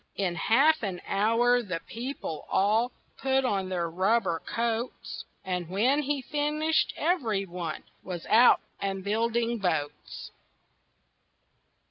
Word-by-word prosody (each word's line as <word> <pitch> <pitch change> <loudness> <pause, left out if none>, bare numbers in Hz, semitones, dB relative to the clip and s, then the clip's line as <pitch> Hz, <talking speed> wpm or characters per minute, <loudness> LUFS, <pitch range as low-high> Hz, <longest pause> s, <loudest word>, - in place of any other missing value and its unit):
In 190 -3 0
half 275 - +3
an 190 -5 -3
hour 230 +4 +3
the 180 -7 -4
people 235 - -6
all 220 +5 +2 0.3
Put 265 0 +1
on 195 -5 0
their 175 -2 -1
rubber 185 +1 +1
coats, 230 +1 -3 0.2
And 180 -3 -3
when 245 +10 +2
he 285 -1 -2
finished 300 +3 +1
everyone 200 - -1 0.2
Was 175 -3 -6
out 235 +3 +6 0.2
and 195 -1 -3
building 230 +3 0
boats. 160 -7 -3
225 Hz, 110 wpm, -28 LUFS, 185-250 Hz, 0.3 s, out